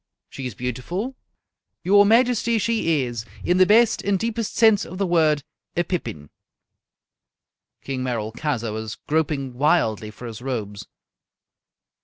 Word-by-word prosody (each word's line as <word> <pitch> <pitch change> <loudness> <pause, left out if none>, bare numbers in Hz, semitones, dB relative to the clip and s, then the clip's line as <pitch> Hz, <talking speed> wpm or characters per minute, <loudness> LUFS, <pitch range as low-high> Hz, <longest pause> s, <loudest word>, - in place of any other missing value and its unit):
"She 135 -2 -5
is 120 - -8
beautiful?" 170 - -4 0.7
"Your 205 +3 +5
majesty, 235 0 +3
she 205 -10 +1
is, 120 -3 -4 0.2
in 180 - +2
the 185 0 +5
best 225 +2 +4
and 200 -1 +1
deepest 230 +1 -3
sense 220 -3 +5
of 185 - -8
the 195 - 0
word, 155 -5 +2 0.3
a 175 - +3
pippin!" 120 - -5 1.5
King 135 -2 -3
Merolchazzar 115 +1 -2
was 110 0 -5
groping 145 -4 -1
wildly 120 -6 +1
for 115 +3 -11
his 115 -1 -7
robes. 105 -6 -5
155 Hz, 130 wpm, -23 LUFS, 120-200 Hz, 1.5 s, Your